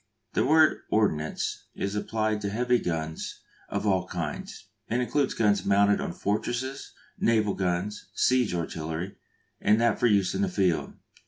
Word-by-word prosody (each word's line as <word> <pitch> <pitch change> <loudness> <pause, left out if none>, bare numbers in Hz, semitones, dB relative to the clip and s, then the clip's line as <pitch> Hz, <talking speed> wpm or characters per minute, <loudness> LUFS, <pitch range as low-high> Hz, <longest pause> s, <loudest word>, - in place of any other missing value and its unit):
The - - +2
word 155 +3 +5
"ordnance" 80 -8 0
is 100 0 -2
applied 110 0 -1
to 100 - -2
heavy 120 +3 +2
guns 80 -2 -4 0.3
of - - -2
all 95 -3 +2
kinds, - - -5 0.2
and 120 - 0
includes 130 +3 0
guns 105 -2 +2
mounted 100 +1 +3
on - - -3
fortresses, 120 +8 -3 0.3
naval 110 -3 +2
guns, 95 +2 -2
siege 125 -7 +2
artillery, 80 +2 -4 0.4
and 105 +1 +4
that 115 -2 +2
for 120 - +4
use 100 -4 +3
in - - -1
the 200 - +1
field. 95 - 0
105 Hz, 150 wpm, -27 LUFS, 95-120 Hz, 0.4 s, word